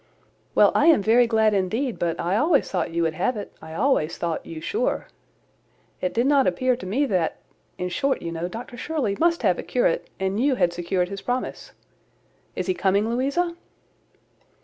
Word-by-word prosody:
"Well, - - +6
I - - +3
am 315 -11 +5
very 235 +3 +5
glad 220 -2 +3
indeed: 220 +7 -1
but 170 -1 -1
I 175 +3 0
always 290 +5 +2
thought 180 -3 -1
you 170 0 0
would 160 -1 0
have 250 +9 -1
it; 205 - -7
I 160 0 -9
always 200 - +1
thought 170 -2 -2
you 165 - -7
sure. 450 - -1 1.0
It 180 - 0
did 235 +2 +1
not 280 -1 +4
appear 250 +8 +1
to 240 - -8
me 260 +10 +1
that—in 180 - -4
short, 275 +8 -1
you 170 - -4
know, 165 +1 -3
Dr 235 +5 -8
Shirley 265 -9 -1
must 335 0 +2
have - - +2
a - - -1
curate, - - 0
and 190 +2 -1
you 270 +1 +2
had 175 -6 +1
secured 180 +1 -1
his 195 0 -6
promise. 250 +1 -4 0.8
Is - - -2
he 185 - +1
coming, 200 +4 +1
Louisa?" 280 +8 0
215 Hz, 185 wpm, -24 LUFS, 180-270 Hz, 1.0 s, Well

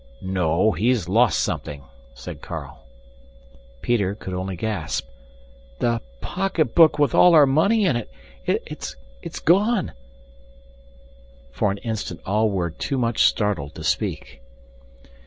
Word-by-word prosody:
"No, 95 +1 +1
he's 110 -4 +1
lost 115 +5 +3
something," 70 -1 -3 0.3
said - - -9
Carl. - - -8 1.0
Peter 100 -5 +1
could 95 -3 -7
only 95 +1 -3
gasp, 90 -4 -3 0.7
"The 115 -1 0 0.2
pocketbook 165 -4 +2
with 145 -4 +2
all 180 -1 +6
our 150 -2 +8
money 195 +11 +3
in 160 -9 +2
it 120 - -4 0.4
it's - - -3 0.5
gone!" 200 +4 +3 1.6
For 100 - 0
an 100 - -2
instant 110 -6 -4
all 105 +3 +2
were 90 -4 -1
too 135 - -3
much 115 -2 0
startled 95 -9 0
to 80 - -8
speak. 80 - -2
110 Hz, 120 wpm, -23 LUFS, 95-140 Hz, 1.6 s, our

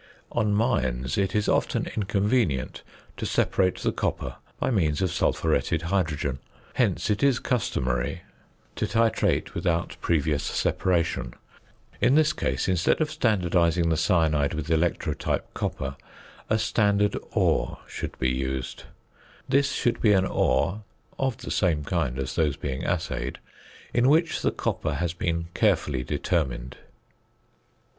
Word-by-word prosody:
_ - - -27 0.3
On 110 -3 +1
mines 65 - 0
it 95 0 0
is 105 -1 +1
often - - +1
inconvenient 100 - 0 0.4
to - - -3
separate 95 -2 +1
the - - +2
copper - - -3 0.2
by - - 0
means 80 -9 +1
of 90 - 0
sulphuretted 80 -1 +1
hydrogen; 80 -7 -1 0.3
hence - - +1
it 105 - 0
is 140 -3 +4
customary 65 - -1 0.5
to - - 0
titrate 115 +1 +1
without 85 -1 -1
previous 75 -3 +1
separation. 85 -8 0 0.7
In 125 +3 +4
this 155 0 +4
case, 65 +1 -1
instead 90 -3 +2
of 155 -1 +1
standardising 85 -6 +2
the - - +3
cyanide 80 -2 +2
with 80 +1 -4
electrotype 80 0 0
copper, 70 +1 -3 0.5
a 110 - +3
standard 105 -2 +2 0.2
ore - - +1
should - - -6
be 65 -1 +1
used. 65 0 -3 0.6
This 140 +1 +3
should 120 - 0
be 105 -3 +5
an 95 -1 +3
ore 100 +2 +1 0.4
(of 135 -4 0
the - - -7
same 80 -6 +1
kind 70 -5 -1
as 65 -1 -3
those 75 -4 +1
being 65 -3 -4
assayed) - - -2 0.6
in 120 +2 +4
which 160 +3 +3
the - - +2
copper - - -2
has 85 -1 -1
been 85 -1 -2
carefully 70 -6 +1
determined. 65 -4 -2
85 Hz, 135 wpm, -26 LUFS, 75-105 Hz, 0.7 s, be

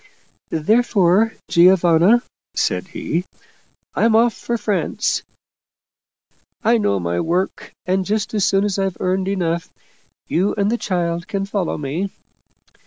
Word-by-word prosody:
Therefore, 210 +3 +2
Giovanna/ 180 +5 +5 0.3
said - - 0
he, 175 - -3 0.4
' - - -42
I'm 225 -1 +3
off 230 +1 +4
for 235 - -3
France. 210 -3 -1 1.4
I 230 +1 +4
know 100 - +1
my 85 0 -2
work, 180 +3 -2
and 185 +1 +1
just 210 +3 -2
as 210 -2 +1
soon 195 +1 +3
as 200 -1 -1
I've 195 -2 -1
earned 185 +1 0
enough, 170 -4 -1 0.5
you 190 +5 0
and 205 0 +1
the 240 - +1
child 170 -3 -2
can 195 -1 -2
follow 195 -3 -2
me.' 155 +7 -3
190 Hz, 130 wpm, -20 LUFS, 170-210 Hz, 1.4 s, Giovanna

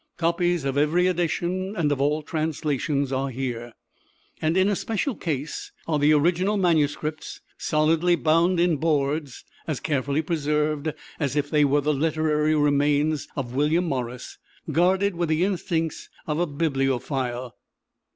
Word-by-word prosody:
Copies 170 -1 +1
of 135 +1 0
every 160 +5 +3
edition 180 +2 -1
and 155 -6 +1
of 140 -1 0
all 150 +2 +1
translations 150 -3 -1
are 135 +1 -1
here. 120 -2 -4 0.7
And 160 +3 +1
in 190 +1 +4
a 205 - +2
special 225 +8 -2
case 150 -4 -4 0.2
are 155 -2 +1
the 145 +1 +4
original 175 +7 +2
manuscripts, 155 -3 0 0.2
solidly 160 +3 +2
bound 170 +2 +2
in 170 -2 +3
boards, 145 -2 -1 0.2
as 155 -5 -2
carefully 145 +1 -1
preserved 150 -1 0 0.3
as 140 -2 -1
were 145 0 +2
the 150 +2 +1
"literary 155 +1 +1
remains" 145 +1 +2
of 125 -4 -4
William 150 +6 +2
Morris, 125 -5 -4 0.3
guarded 190 +4 +2
with 170 -1 -2
the 160 +2 +2
instincts 165 -4 -2 0.2
of 150 0 -2
a 175 - +1
bibliophile. 135 -4 -1
155 Hz, 135 wpm, -24 LUFS, 140-170 Hz, 0.7 s, in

